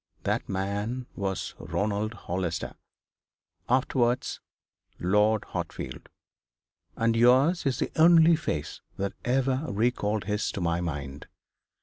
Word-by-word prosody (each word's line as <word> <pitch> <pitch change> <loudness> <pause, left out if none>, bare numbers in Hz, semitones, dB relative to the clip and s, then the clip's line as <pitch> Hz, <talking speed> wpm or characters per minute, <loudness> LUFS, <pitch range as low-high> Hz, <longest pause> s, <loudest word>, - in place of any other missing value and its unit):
That - - -1
man 100 +6 -2
was 95 -2 -3
Ronald 105 +2 -2
Hollister, 90 -4 -3 1.0
afterwards 125 -1 +1 0.6
Lord 105 +4 +2
Hartfield. - - -6 0.9
And 115 0 +1
yours 130 +8 +4
is 135 - 0
the - - -2
only 165 0 +7
face 75 - -4 0.2
that 100 0 -2
ever 130 +2 +1
recalled 105 -1 0
his 105 +1 -1
to - - -4
my 85 -1 0
mind. 75 -4 -5
110 Hz, 105 wpm, -27 LUFS, 95-125 Hz, 1.0 s, only